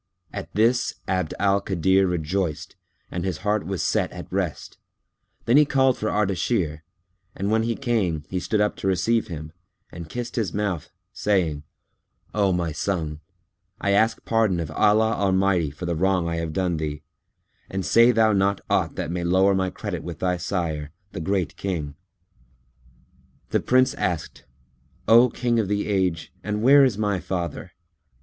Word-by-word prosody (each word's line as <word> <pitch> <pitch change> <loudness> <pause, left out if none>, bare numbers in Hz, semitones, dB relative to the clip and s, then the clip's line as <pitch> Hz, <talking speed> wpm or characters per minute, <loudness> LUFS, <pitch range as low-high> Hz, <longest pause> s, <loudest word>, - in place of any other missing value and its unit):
At - - -6
this 115 +3 +2
Abd 95 -4 -1
al 100 0 +2
Kadir 95 0 +2
rejoiced 90 -1 -2 0.4
and 90 0 -3
his 95 -4 -2
heart 105 -4 0
was 95 -3 -2
set - - 0
at - - -9
rest; - - -3 0.7
then 120 +4 +4
he 150 - +8
called 135 -2 +3
for 110 - -2
Ardashir, 95 -5 0 0.5
and 100 +2 -2
when 110 0 +3
he 115 0 -1
came, 105 - -1
he 90 - -2
stood 105 +3 0
up 105 - +1
to - - -3
receive 105 +5 +1
him 80 -4 -7 0.4
and 85 -2 -9
kissed 120 +3 -5
his 105 -6 -1
mouth, 100 -6 -2 0.2
saying, 90 -8 0 0.7
"O 100 -2 +2
my 85 -2 -1
son, 80 -2 -3 0.6
I 100 - 0
ask 110 +3 +2
pardon 110 -6 +2
of 80 - -4
Allah 110 +1 +3
Almighty 95 -5 +2
for 75 +5 -8
the 85 -1 -1
wrong 90 0 +1
I 85 0 -2
have 80 -1 -3
done 90 0 -1
thee, 75 -1 -4 0.7
and 95 -1 -3
say 115 +1 +6
thou 110 -2 +4
not 100 0 +2
aught - - +1
that 80 - -3
may 90 0 -2
lower 95 +3 +3
my 95 -1 0
credit 95 -3 -5
with 85 -2 -7
thy 90 +1 0
sire, 80 -5 -3 0.2
the 95 - -6
Great 95 -3 -1
King." 80 -7 -3 1.6
The - - +3
Prince 130 +1 +3
asked 85 -4 -3 0.6
"O 120 +3 +7
King 120 0 0
of 105 - 0
the 105 +1 -1
Age, 95 -5 -1
and 105 +2 -2
where 140 +3 +7
is 125 -7 +2
my 105 -3 0
father?" 90 0 -4
95 Hz, 165 wpm, -24 LUFS, 85-105 Hz, 1.6 s, he